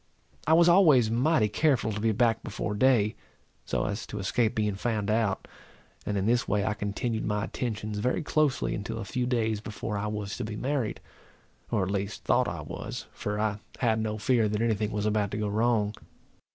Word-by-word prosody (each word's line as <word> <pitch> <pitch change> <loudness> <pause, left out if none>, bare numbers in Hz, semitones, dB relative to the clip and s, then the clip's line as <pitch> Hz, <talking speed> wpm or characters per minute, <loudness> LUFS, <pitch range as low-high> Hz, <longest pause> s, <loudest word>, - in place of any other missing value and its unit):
I 160 - +5
was 170 +1 +6
always 155 - +6
mighty 125 0 +3
careful 130 0 +1
to 105 - -3
be 110 +1 +2
back 115 0 +2
before 105 - -4
day, 110 -1 +3 0.5
so - - -1
as 105 +2 -3
to 105 - -6
escape 110 +3 0
being 105 -2 +1
found 105 0 -1
out; 110 -3 0 0.6
and 105 - 0
in 95 - 0
this 120 +2 +2
way 105 -1 +1
I 110 - +1
continued 110 +2 -2
my 105 -1 -1
attentions 105 -3 -3
very 125 +9 0
closely 140 - +1
until - - -4
a - - -4
few 125 +2 -2
days 110 -4 0
before 105 -1 -4
I 105 - -2
was 105 -1 -4
to 125 - -3
be 105 -1 -5
married, 130 -1 -2 0.7
or 100 - +1
at 95 - -2
least 100 +1 -3
thought - - +3
I - - -4
was, - - -6
for 105 0 -3
I 105 -1 0 0.2
had 110 -3 +2
no 110 -1 -2
fear 110 0 +2
that 105 0 -1
any 115 -1 +3
thing 105 0 -1
was 105 0 -2
about 105 -1 +1
to 100 - -4
go 105 -1 -1
wrong. 105 0 +1
110 Hz, 205 wpm, -28 LUFS, 105-120 Hz, 0.7 s, was